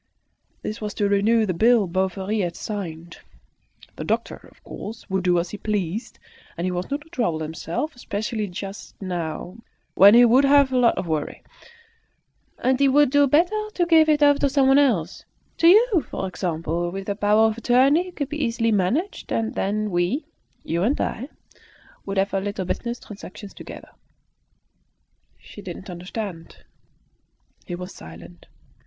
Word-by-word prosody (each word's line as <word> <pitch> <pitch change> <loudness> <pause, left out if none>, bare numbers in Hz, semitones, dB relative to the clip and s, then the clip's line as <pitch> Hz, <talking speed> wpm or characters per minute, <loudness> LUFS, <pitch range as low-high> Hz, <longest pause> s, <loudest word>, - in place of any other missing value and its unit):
This 215 - -5
was 210 -1 -4
to 205 - +1
renew 215 +3 +3
the 185 - -1
bill 225 +3 +4
Bovary 190 +3 -1
had 175 -3 -2
signed. 170 -5 -6 0.8
The - - -4
doctor, - - -3
of - - -26
course, 220 +2 -9
would 190 -1 0
do 180 -1 +3
as 170 +1 -2
he 210 - -7
pleased; 205 0 -3 0.4
he 180 +2 -1
was 180 0 -4
not 285 +1 -2
to 310 - -18
trouble 225 - -1
himself, 165 - -4
especially 215 -2 -3
just 195 +2 -8
now, 175 0 -5 0.4
when 200 +3 +8
he 245 +1 +8
would 250 +4 +5
have 280 -1 +5
a 255 - +1
lot 235 -2 +3
of - - -2
worry. 155 -3 -3 1.1
"And 260 0 +1
he 280 - +4
would 285 0 +4
do 285 0 +4
better 355 +10 +2
to 350 - +2
give 320 -2 +5
it 300 -1 +3
over 285 -1 +5
to 280 - +2
someone 270 0 +4
else 200 - +1 0.3
to 330 - +4
you, 415 -1 +5
for 190 - -3
example. 175 -2 -2
With 195 +2 -6
a 200 - -1
power 210 +2 +3
of 220 +1 -5
attorney 270 +9 +3
it 360 - -12
could 285 -3 -3
be 300 0 -3
easily 230 -1 0
managed, 230 - -1
and 225 -1 -1
then 210 +1 -1
we 175 - 0 0.4
(you 170 +1 -2
and 240 +10 +1
I) 255 +6 -3 0.8
would 195 0 -3
have 195 +1 +1
our 195 - 0
little 200 -1 -3
business 235 +6 -3
transactions 200 -1 -11
together." - - -11 1.5
She 205 - -13
did 180 -4 -7
not 190 - -10
understand. 180 -1 -7 1.0
He 175 - -4
was 180 +2 -8
silent. 85 +2 -13
210 Hz, 170 wpm, -23 LUFS, 180-265 Hz, 1.5 s, when